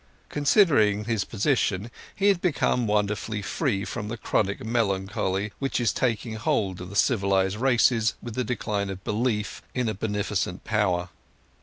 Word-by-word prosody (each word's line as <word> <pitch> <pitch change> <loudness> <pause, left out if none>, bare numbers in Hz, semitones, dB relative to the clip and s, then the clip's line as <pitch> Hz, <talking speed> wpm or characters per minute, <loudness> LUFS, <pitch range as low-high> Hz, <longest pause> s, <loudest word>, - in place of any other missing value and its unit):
Considering 140 - +3
his 115 -4 0
position 110 -2 0 0.2
he 200 0 +4
became 165 -9 0
wonderfully 105 0 -1
free 105 -4 -1
from 110 -2 -5
the 120 +3 -4
chronic 100 -1 -1
melancholy 100 -3 -1
which 135 -2 -1
is 115 -5 +1
taking 115 -2 -1
hold 95 -3 0
of 90 - -7
the 100 - -9
civilized 100 -3 +2
races 120 -2 +3
with 120 - -7
the 125 - -1
decline 105 -4 -2
of 95 0 -7
belief 105 -1 -1
in 125 -2 0
a 110 - 0
beneficent 105 -3 -2
Power. 95 -5 0
105 Hz, 145 wpm, -26 LUFS, 100-120 Hz, 0.2 s, he